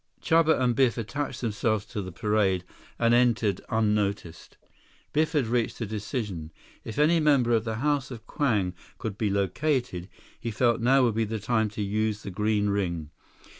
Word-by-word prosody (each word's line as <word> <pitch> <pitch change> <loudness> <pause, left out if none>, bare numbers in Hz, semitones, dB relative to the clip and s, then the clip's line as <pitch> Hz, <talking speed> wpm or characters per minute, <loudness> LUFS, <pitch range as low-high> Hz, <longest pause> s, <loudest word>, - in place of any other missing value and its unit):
Chuba 165 -1 +3
and 125 -2 +2
Biff 125 -2 +3
attached 130 +4 -4
themselves 110 -2 0
to 105 -1 -5
the 95 -1 -6
parade 100 -2 +1 0.3
and 115 0 +3
entered 115 -5 +2
unnoticed. 105 -6 -1 0.6
Biff 155 +2 +1
had 145 -5 +2
reached 115 0 -1
a 115 - -2
decision. 105 - -4 0.3
If 110 - -7
any 155 +3 +4
member 140 -6 +3
of 115 0 +2
the 110 -1 -2
House 140 +2 0
of 115 -4 -9
Kwang 105 -12 0 0.2
could 110 -4 -4
be 105 0 0
located, 100 - -1 0.3
he 115 - -4
felt 120 +1 +1
now 130 +3 +4
would 120 -3 +2
be 115 +1 +1
the 110 +1 -3
time 110 0 0
to 105 - 0
use 105 +1 -1
the 100 - -6
green 105 +1 +1
ring. 85 -6 -2
110 Hz, 170 wpm, -27 LUFS, 105-125 Hz, 0.6 s, any